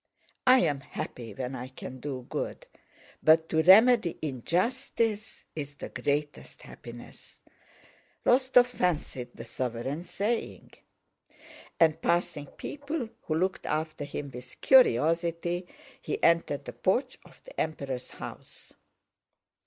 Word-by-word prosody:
'I 255 +1 +8
am 145 - +1
happy 120 -3 -7
when 130 0 -4
I 125 0 -5
can 130 0 -9
do 130 -2 -5
good, - - -4 0.6
but 160 +1 +5
to 160 - +3
remedy 210 +1 +6
injustice 215 - -1
is 145 -2 -5
the - - -7
greatest 145 +3 -3
happiness,'" - - -12 0.9
Rostóv 255 -1 +5
fancied 165 - -2
the 115 - -8
sovereign 130 +6 -3
saying. 205 +6 -3 1.1
And 160 -1 +4
passing 170 -4 0
people 285 - -5
who 155 - -2
looked 185 +3 -1
after 155 -1 -2
him 145 -1 -5
with 125 0 -10
curiosity, 170 - +3 0.3
he - - -4
entered 165 -4 +3
the 125 - -7
porch 220 - 0
of - - -18
the - - -5
Emperor's 135 -5 -3
house. - - -10
160 Hz, 115 wpm, -29 LUFS, 135-205 Hz, 1.1 s, I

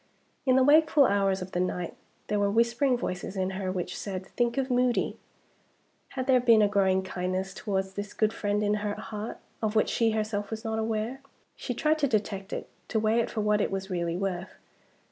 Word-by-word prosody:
In 255 - +5
the 260 - +5
wakeful 300 0 +6
hours 195 -3 +2
of 185 - -10
the 175 - -1
night 180 -1 -2 0.3
there 210 -1 0
were 200 0 +2
whispering 235 +4 +2
voices 185 -3 -4
in 190 0 -1
her 190 -1 -3
which 180 -2 -3
said: 190 -2 -5
"Think 240 +5 -1
of 265 -1 0
Moody!" 250 -1 +1 1.0
Had 260 - -1
there 260 -2 +5
been 230 -3 +5
a - - +5
growing 190 -2 +2
kindness 185 +1 -3
towards 190 -2 -2
this 205 +1 -5
good 215 0 +2
friend 205 -1 0
in 205 0 +2
her 205 0 -2
heart, 215 0 -6 0.2
of 220 -1 -1
which 215 - +3
she 230 -1 +2
herself 215 -2 -2
was 220 0 -6
not 220 0 -1
aware? 225 +4 -2 0.3
She 245 - -4
tried 310 +3 +2
to 285 - +3
detect 205 -4 -2
it - - -4 0.2
to 220 - 0
weigh 220 +2 +2
it 230 - 0
for 220 - -2
what 210 0 +2
it - - +1
was 195 0 -4
really 170 -1 -1
worth. 190 -1 -3
210 Hz, 205 wpm, -28 LUFS, 190-235 Hz, 1.0 s, wakeful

